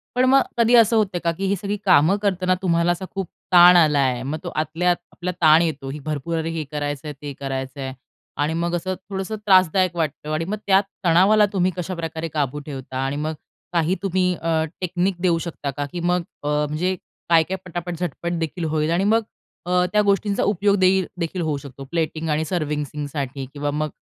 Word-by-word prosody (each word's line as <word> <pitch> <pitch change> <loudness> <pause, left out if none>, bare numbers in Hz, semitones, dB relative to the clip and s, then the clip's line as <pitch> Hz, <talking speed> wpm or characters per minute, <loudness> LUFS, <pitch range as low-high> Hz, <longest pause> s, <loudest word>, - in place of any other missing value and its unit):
पण 250 +1 +3
मग 270 +1 +6 0.2
कधी 235 +1 +5
असं 230 -1 +6
होतंय 200 -5 +1
का 170 - +2
की 190 +4 -4
ही 200 - +2
सगळी 200 +2 -3
कामं 180 +1 +5
करताना 185 -2 +1
तुम्हाला 170 -2 +2
असा 175 +2 -3
खूप 195 -2 -2 0.3
ताण 175 0 +9
आला 155 -4 +4
आहे? 130 -3 +1
मग, 145 +4 -3
तो 175 - -4
आतल्यात 165 +3 +1 0.2
आपला 180 +1 -4
ताण 155 0 +7
येतो 150 -5 -2
ही 145 +3 -6
भरपूर 155 +2 -2
हे 165 -1 -2
करायचं 145 -1 -3
आहे, 150 - -4
ते 145 -1 -6
करायचं 135 0 -4
आहे. 130 -1 -4 0.4
आणि 150 +2 0
मग 170 +1 -1
असं 185 +2 -2
थोडंसं 195 +2 -3
त्रासदायक 185 -2 +4
वाटतं. 155 -2 -3
आणि 155 +2 -1
मग 205 +4 -3
त्यात 195 0 +5 0.2
तणावाला 190 +6 +5
तुम्ही 185 -1 +2
कशाप्रकारे 165 -2 -4
काबू 145 -2 -1
ठेवता? 135 -3 -7
आणि 135 +1 -2
मग 155 +2 -2 0.4
काही 170 +1 +2
तुम्ही 185 -1 +1
अ, 165 -1 0 0.2
टेक्निक 180 +1 0
देऊ 175 -2 +3
शकता 160 -4 -4
का? 145 +2 -3
की 175 - -4
मग 175 +1 +1 0.2
अ, - - -3 0.2
म्हणजे 165 +6 -1 0.3
काय-काय 170 +3 +3
पटापट, 175 0 -5
झटपट 175 0 -3
देखील 165 +1 -3
होईल. 155 0 0
आणि 175 +3 +2
मग 220 +3 +3 0.4
अ, 180 0 +2
त्या 210 - +5
गोष्टींचा 200 0 +1
उपयोग 205 0 +2
देई 190 +1 +4 0.2
देखील 170 +1 -2
होऊ 155 -3 -1
शकतो 140 -1 -10
प्लेटिंग 160 -1 -2
आणि 155 +1 0
सर्व्हिसिंगसाठी 145 -4 -3
किंवा 145 0 -2
मग 155 +1 -1
170 Hz, 195 wpm, -22 LUFS, 150-185 Hz, 0.4 s, ताण